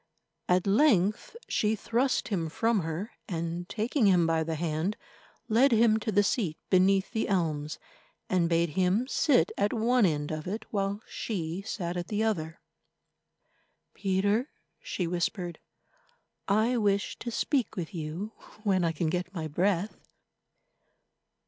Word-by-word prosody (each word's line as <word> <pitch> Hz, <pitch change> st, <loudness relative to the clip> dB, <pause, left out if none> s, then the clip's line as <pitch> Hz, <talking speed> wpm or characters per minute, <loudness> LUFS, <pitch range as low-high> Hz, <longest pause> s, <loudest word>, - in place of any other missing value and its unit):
At 180 Hz, 0 st, +3 dB
length 210 Hz, -, +3 dB
she 215 Hz, +1 st, +1 dB
thrust 240 Hz, +5 st, 0 dB
him 170 Hz, -6 st, -1 dB
from 225 Hz, +6 st, +1 dB
her 165 Hz, +5 st, -4 dB, 0.2 s
and, 170 Hz, 0 st, -3 dB
taking 230 Hz, +2 st, +1 dB
him 180 Hz, -3 st, +5 dB
by 165 Hz, 0 st, +1 dB
the 160 Hz, 0 st, -3 dB
hand, 160 Hz, +5 st, -1 dB, 0.5 s
led 245 Hz, +5 st, +4 dB
him 225 Hz, -1 st, +5 dB
to 220 Hz, 0 st, -2 dB
the 205 Hz, 0 st, +4 dB
seat 195 Hz, -7 st, 0 dB
beneath 190 Hz, +1 st, +4 dB
the 225 Hz, -2 st, -1 dB
elms, 155 Hz, -6 st, -1 dB, 0.5 s
and 175 Hz, -3 st, +2 dB
bade 170 Hz, 0 st, +2 dB
him 190 Hz, -, +1 dB
sit 265 Hz, -, +3 dB
at 205 Hz, +1 st, +2 dB
one 235 Hz, -1 st, +3 dB
end 150 Hz, -2 st, -2 dB
of 155 Hz, +1 st, -4 dB
it, 215 Hz, +4 st, -4 dB
while 200 Hz, +1 st, -1 dB
she 175 Hz, -4 st, -4 dB
sat 180 Hz, -4 st, -4 dB
at 175 Hz, -, -3 dB
the 215 Hz, +1 st, -1 dB
other. 165 Hz, -7 st, -2 dB, 1.3 s
"Peter," 205 Hz, +7 st, +1 dB, 0.3 s
she 180 Hz, -, -3 dB
whispered, 175 Hz, 0 st, -2 dB, 0.9 s
"I 220 Hz, +5 st, +2 dB
wish 200 Hz, -3 st, 0 dB
to 240 Hz, -, -4 dB
speak 240 Hz, -1 st, 0 dB
with 175 Hz, -5 st, -5 dB
you 170 Hz, +6 st, -4 dB, 0.3 s
when 190 Hz, -4 st, +2 dB
I 165 Hz, -1 st, +1 dB
can 160 Hz, +1 st, -1 dB
get 180 Hz, +3 st, -2 dB
my 160 Hz, -2 st, -3 dB
breath. 180 Hz, +5 st, 0 dB
190 Hz, 140 wpm, -29 LUFS, 170-220 Hz, 1.3 s, him